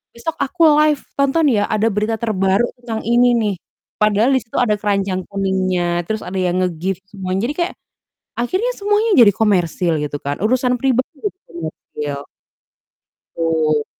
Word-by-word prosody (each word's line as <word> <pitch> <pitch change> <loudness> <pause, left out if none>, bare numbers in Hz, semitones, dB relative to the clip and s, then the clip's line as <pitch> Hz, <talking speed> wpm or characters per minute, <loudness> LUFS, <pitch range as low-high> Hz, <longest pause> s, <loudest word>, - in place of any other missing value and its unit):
"Besok 320 +7 -4
aku 335 +5 -5 0.2
live, 300 -2 +3 0.2
tonton 280 +3 +2
ya, 205 -2 +1
ada 215 0 +1
berita 215 +2 0
terbaru 205 0 +1
tentang 230 -2 -4
ini 240 +2 +4
nih." 210 -4 0 0.4
Padahal 210 +3 +3
di - - +3
situ 225 - -14
ada 210 -4 +2
keranjang 195 -3 -1
kuningnya, 185 -3 -1
terus 220 +2 -3
ada 190 +1 -5
yang 180 0 +1
nge-gift 180 +1 -2
semuanya. 195 +3 -2
Jadi - - -2
kayak, 350 +1 -1 0.6
akhirnya 370 - 0
semuanya 415 +2 +1
jadi 220 -5 +7
komersil 180 -5 +1
gitu 145 0 -4
kan, 140 +1 -3
urusan 250 +2 +2
pribadi 260 0 0
jadi 385 -2 -3
komersil. 150 -3 -6 1.2
Betul. 160 -2 +1
210 Hz, 150 wpm, -19 LUFS, 185-245 Hz, 1.2 s, jadi